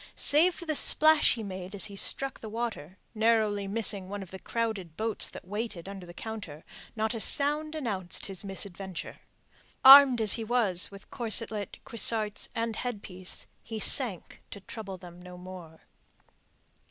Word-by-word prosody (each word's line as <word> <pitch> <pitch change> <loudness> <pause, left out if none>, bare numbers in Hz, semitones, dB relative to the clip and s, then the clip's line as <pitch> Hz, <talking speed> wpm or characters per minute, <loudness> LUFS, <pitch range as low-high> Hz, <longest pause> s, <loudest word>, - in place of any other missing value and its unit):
Save 335 +5 +4
for 345 - -9
the 315 - -1
splash 310 0 +4
he 225 - -6
made 190 -1 -7
as 195 - 0
he 200 - -9
struck 270 +6 +2
the 220 - -8
water, 210 -7 -5 0.2
narrowly 215 -3 +1
missing 200 -2 -1
one 200 0 -5
of 185 - -15
the 190 - -9
crowded 210 -9 -4
boats 220 0 -2
that - - -11
waited 205 -3 -5
under 195 -2 -9
the 175 - -11
counter, 205 -9 -8 0.3
not 220 +1 -1
a 225 - -4
sound 300 +5 +1
announced 200 - -4
his 195 0 -7
misadventure. 195 -1 -7 0.7
Armed 270 -2 +10
as 215 -3 +5
he 230 - -1
was 215 -6 +2
with 200 0 -15
corselet, 220 -3 -1
cuissarts, 215 -1 +1
and 230 -1 -2
headpiece, 200 -6 -4 0.2
he 225 -1 -7
sank 225 - +1
to 200 - -9
trouble 195 -2 -8
them 175 -1 -13
no 180 0 -11
more. 180 -3 -11
210 Hz, 160 wpm, -28 LUFS, 190-230 Hz, 0.7 s, Armed